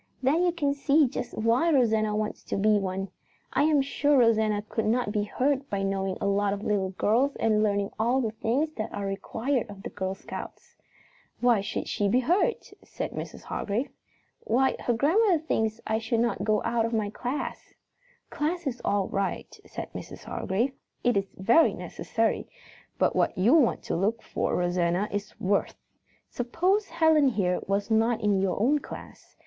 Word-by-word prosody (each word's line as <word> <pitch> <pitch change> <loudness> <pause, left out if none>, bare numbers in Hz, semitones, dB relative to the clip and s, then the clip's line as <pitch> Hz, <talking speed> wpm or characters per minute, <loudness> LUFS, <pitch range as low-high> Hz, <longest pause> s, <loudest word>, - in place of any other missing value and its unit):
Then 290 +6 +3
you 360 -1 +3
can 295 -5 0
see 285 +1 +3
just 245 - -5
why 230 +9 +2
Rosanna 220 -6 +2
wants 215 0 -3
to - - -2
be 210 +1 +3
one. 195 0 -3 0.4
I - - +3
am 300 -3 +3
sure 285 +1 +2
Rosanna 220 -3 +3
could 225 - -2
not 235 -1 +1
be 210 -1 0
hurt 275 +5 0
by 195 -1 -1
knowing 195 -1 -1
a - - -2
lot 200 0 +1
of 200 0 -5
little 200 -3 0
girls 230 +9 +1
and 215 -1 +2
learning 200 -1 +1
all 240 +4 +2
the 225 -4 -1
things 245 +8 -1
that 215 - -3
are 200 - -4
required 225 +5 -2
of 200 -1 -10
the - - -6
Girl 190 -1 -3
Scouts." - - -9 0.6
"Why 240 -4 +3
should 200 - -4
she 205 -1 0
be 250 +5 +3
hurt?" 365 - 0
said - - -5
Mrs. - - -7
Hargrave. 220 +6 -3 0.5
"Why, 260 +4 +1 0.2
grandmother 355 - +4
thinks 220 -8 -1
I 220 0 0
should 225 0 -1
not 235 -4 0
go 215 0 +1
out 235 -1 +1
of 230 +1 -2
my 210 -2 0
class." 250 +6 -5 0.6
"Class 335 +3 -2
is 255 -3 -3
all 200 -2 +1
right," 195 -1 -3
said - - -7
Mrs. - - -8
Hargrave. 235 +8 -1 0.3
"It 245 0 +3
is 195 -1 -2
very 230 - +4
necessary, - - -2 0.5
but - - +2
what - - +1
you 205 +9 +4
want 300 -8 +3
to - - -2
look 210 +6 0
for, - - -2
Rosanna, 175 +2 0
is 205 0 -5
worth. 200 +2 0 0.5
Suppose 365 - 0
Helen 320 -3 +4
here 190 -8 +1
was 200 +3 -1
not 225 +1 +3
in 205 -2 +2
your 195 -1 0
own 275 +8 +3
class. - - -11
225 Hz, 175 wpm, -27 LUFS, 200-270 Hz, 0.6 s, grandmother